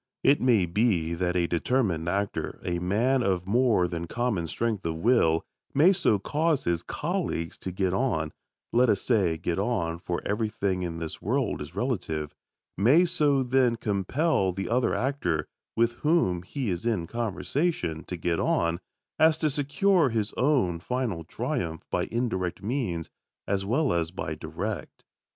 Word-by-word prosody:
It 140 - +4
may 115 -7 +4
be 85 -3 +1
that 90 +1 -1
a 90 -1 +2
determined 85 -2 0
actor 100 +2 -2
a 85 -1 -1
man 115 +9 +2
of 95 -5 0
more 110 -3 +3
than 85 -1 -4
common 110 -6 -1
strength 110 +4 -2
of 80 -1 -2
will 80 -4 +3 0.3
may 165 +8 +6
so 175 - +2
cause 150 - 0
his 85 -1 0
colleague 150 - -2
to 95 - -4
get 95 0 0
on 95 - 0 0.4
(let 125 +1 +4
us 100 - +3
say 95 -9 +1
"get 85 +3 -2
on," 95 -7 -1
for 85 0 -3
everything 105 -3 -1
in 85 -2 -3
this 80 -1 -6
world 125 - 0
is 75 +4 -8
relative); 90 - -2 0.4
may 135 - +5
so, 150 -6 +2
then, 125 -1 +3
compel 105 - 0
the 95 +2 -4
other 125 +2 +2
actor, 120 - -1 0.3
with 115 +1 +3
whom 150 - +2
he 120 +4 -3
is 85 -1 -3
in 110 -8 0
conversation, 115 - -2
to 90 - -5
get 85 0 -1
on, 85 0 +1 0.4
as 160 0 +5
to 155 -2 +1
secure 145 +4 +2
his 110 -2 -1
own 125 - +2
final 115 -5 -2
triumph 80 0 -3
by - - +1
indirect 105 -8 -2
means 100 - -2 0.4
as 95 -1 0
well 135 +8 +1
as 85 -1 0
by 90 - -4
direct. - - -5
100 Hz, 160 wpm, -27 LUFS, 85-130 Hz, 0.4 s, may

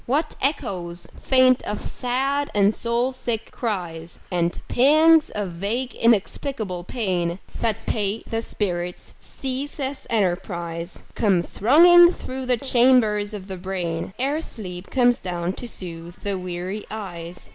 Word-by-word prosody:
What 300 +5 0
echoes 180 - -2
faint 255 -1 +4
of 210 - -4
sad 270 +3 -1
and 205 +1 +4
soul 235 +3 0
sick 235 -3 -4
cries, 175 -7 -4
And 175 -1 0
pangs 310 +4 +5
of 205 -3 -3
vague 210 +9 -3
inexplicable 220 -3 0
pain 180 -7 -1 0.2
That 225 -2 -1
pay 210 0 -1
the 225 0 -3
spirit's 180 -5 -4
ceaseless 270 +1 -4
enterprise, 175 -4 -2
Come 195 -6 +2
thronging 345 - +7
through 260 0 -6
the 250 -1 +2
chambers 235 -5 +3
of 195 -2 -8
the 190 -1 -6
brain 180 -1 -4
Ere 280 +5 0
sleep 180 - -7
comes 245 -1 +3
down 175 0 -3
to 245 - -7
soothe 175 -4 -7
the 200 -1 -1
weary 180 +3 -4
eyes. 180 -5 -7
210 Hz, 130 wpm, -23 LUFS, 180-255 Hz, 0.2 s, thronging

